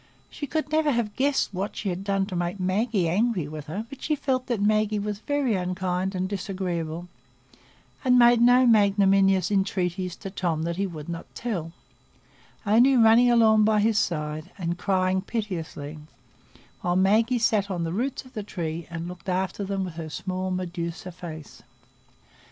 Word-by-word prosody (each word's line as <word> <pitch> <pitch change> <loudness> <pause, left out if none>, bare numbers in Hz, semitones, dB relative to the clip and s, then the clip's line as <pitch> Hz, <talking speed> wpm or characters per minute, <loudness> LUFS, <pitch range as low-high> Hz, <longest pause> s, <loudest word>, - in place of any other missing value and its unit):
She 290 - -6
could 310 +1 -2
never 310 -1 +2
have 235 -6 -1
guessed 270 -5 +1
what 195 +3 -3
she 205 - -3
had 180 +1 -4
done 195 -1 0
to 190 - -6
make 175 +2 -2
Maggie 190 +1 +1
angry 190 -2 +1
with 150 0 -8
her; 200 +9 -4
but 275 +2 -11
she 305 - 0
felt 260 -3 -1
that 240 -4 -1
Maggie 215 +1 +2
was 205 0 -3
very 285 -1 0
unkind 185 0 -2
and 185 0 -1
disagreeable, 180 -4 -4 1.0
and 250 -2 +4
made 240 -1 +6
no 245 +2 +6
magnanimous 195 -4 +4
entreaties 185 -2 -1
to 195 - -8
Tom 170 -5 -1
that 170 +1 -2
he 195 0 0
would 155 -4 -8
not 170 -1 -6
"tell," 180 -9 -3 0.9
only 240 +6 +5
running 230 +1 +6
along 220 -2 +5
by 215 0 +3
his 215 0 +3
side 155 -2 -2
and 175 -1 -3
crying 185 -1 +1
piteously, 165 -8 -5 0.8
while 175 0 0
Maggie 215 +6 +3
sat 215 -3 +1
on 175 -3 -2
the 165 0 -2
roots 255 +7 -2
of 255 - -16
the 215 - -4
tree 170 -5 -5
and 170 0 -5
looked 180 +1 -8
after 190 +2 -1
them 195 -1 -2
with 180 - -7
her 160 -2 -5
small 185 +3 -3
Medusa 180 -1 -4
face. 160 -4 -9
195 Hz, 170 wpm, -25 LUFS, 175-220 Hz, 1.0 s, made